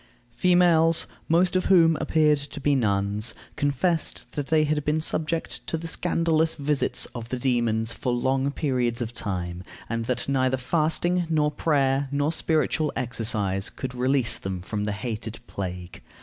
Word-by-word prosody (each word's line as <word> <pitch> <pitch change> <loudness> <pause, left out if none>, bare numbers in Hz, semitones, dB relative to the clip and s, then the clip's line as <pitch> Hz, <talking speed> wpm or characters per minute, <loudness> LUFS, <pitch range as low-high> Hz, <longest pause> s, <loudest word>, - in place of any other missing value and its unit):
Females, 170 0 +4 0.2
most 175 +3 +3
of 185 - +1
whom 165 -4 +5
appeared 150 -2 +3
to 145 +1 -8
be 145 +1 +2
nuns, 105 -2 +1 0.2
confessed 155 +4 0
that 145 -2 -4
they 160 -1 +3
had 150 0 0
been 150 +2 +1
subject 160 +1 -2
to 165 - -1
the 165 +1 -6
scandalous 165 -1 +1
visits 145 -1 0
of 115 -1 -7
the 130 - -2
demons 115 -3 0
for 125 - -2
long 130 +3 +1
periods 125 -5 -1
of 120 -1 -3
time, 90 -5 -3 0.2
and 115 0 -2
that 125 0 -2
neither 130 -1 +1
fasting, 165 +5 0
nor 150 -2 +2
prayer, 140 -3 +1
nor 145 +2 +1
spiritual 155 -1 0
exercise 105 -5 -1
could 130 -2 -6
release 125 0 +1
them 95 -1 -4
from 105 +3 -4
the 105 - -1
hated 110 0 -5
plague. 90 -4 -6
135 Hz, 155 wpm, -25 LUFS, 115-155 Hz, 0.2 s, whom